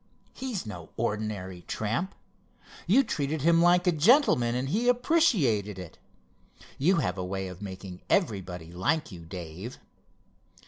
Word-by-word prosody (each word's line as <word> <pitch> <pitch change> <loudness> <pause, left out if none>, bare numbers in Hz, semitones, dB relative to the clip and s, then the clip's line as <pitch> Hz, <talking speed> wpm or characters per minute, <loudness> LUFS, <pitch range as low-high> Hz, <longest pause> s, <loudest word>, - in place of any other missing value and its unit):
He's 255 - -4
no 90 -6 -8
ordinary 105 -5 -3
tramp. 120 - -2 0.7
You 240 +10 +5
treated 150 - -2
him 165 +1 +5
like 175 +1 +5
a 180 - +5
gentleman 160 - +4
and 130 +2 -1
he 225 +9 0
appreciated 210 - +2
it. 90 -3 -9 0.8
You 175 +8 +4
have 95 - -1
a - - -2
way 95 +1 -3
of 90 +1 -9
making 95 -2 -8
everybody 90 - -1
like 125 - 0
you, 85 -3 -10
Dave." 90 +7 -7
115 Hz, 135 wpm, -28 LUFS, -, 0.8 s, You